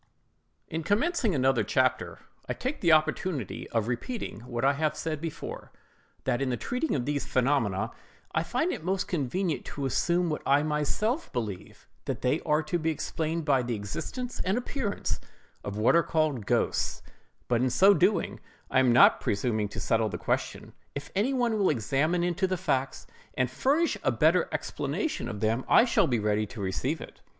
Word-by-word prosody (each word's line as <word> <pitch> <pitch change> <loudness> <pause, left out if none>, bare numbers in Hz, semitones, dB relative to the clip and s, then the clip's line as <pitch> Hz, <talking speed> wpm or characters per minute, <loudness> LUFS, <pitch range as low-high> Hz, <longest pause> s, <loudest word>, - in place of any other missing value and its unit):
IN 160 - -3
commencing 225 - +1
another 130 -3 +3
chapter, 130 +4 +1 0.3
I - - +1
take 260 +4 -4
the 170 - +4
opportunity 155 - +1
of 115 -2 0
repeating 125 - -4
what 120 0 -2
I 140 - +5
have 155 +1 -1
said 155 -2 -3
before, 165 -2 -6
viz., - - -35
that 130 -1 0
in 130 -3 0
treating 250 - -1
of 125 -4 -1
these 145 -1 -2
phenomena, 115 -6 +1 0.4
I - - +2
find 250 - 0
it - - -5
most 190 +2 -1
convenient 170 +2 -1
to 140 - -4
assume 175 +6 +1
what 150 - -2
I 140 +2 +3
myself 155 - -1
believe—that 105 -7 -6
they 130 +5 +2
are 150 +1 +3
to 160 +3 -1
be 160 0 0
explained 160 +1 -2
by 135 -4 +3
the 120 -1 -2
existence 175 - -5
and 190 +4 +1
appearance 250 -4 -2 0.4
of 100 0 -5
what 110 +9 +4
are 170 - +6
called 155 -11 0
GHOSTS; - - 0 0.4
but 120 -1 +2
in 130 - +2
so 195 +10 +6
doing, 185 -1 +1 0.3
I 130 - +4
am 130 -2 +4
not 120 - +6
presuming 105 0 0
to 100 - -6
settle 110 +2 +1
the - - -4
question: - - -2 0.2
if 140 0 -6
any 215 +8 +2
one 240 -4 +1
will 195 - +3
examine 145 +7 +1
into 175 +2 +1
the 185 0 -1
facts 140 -7 -1 0.3
and 125 -1 0
furnish 285 - +1
a - - +2
better - - +3
explanation 310 - -2
of 105 -4 -6
them, 115 +4 +1
I - - +7
shall 210 -7 +3
be 125 - +1
ready 105 0 0
to 110 - -10
receive 125 - -2
it. - - -11
150 Hz, 180 wpm, -28 LUFS, 120-185 Hz, 0.4 s, I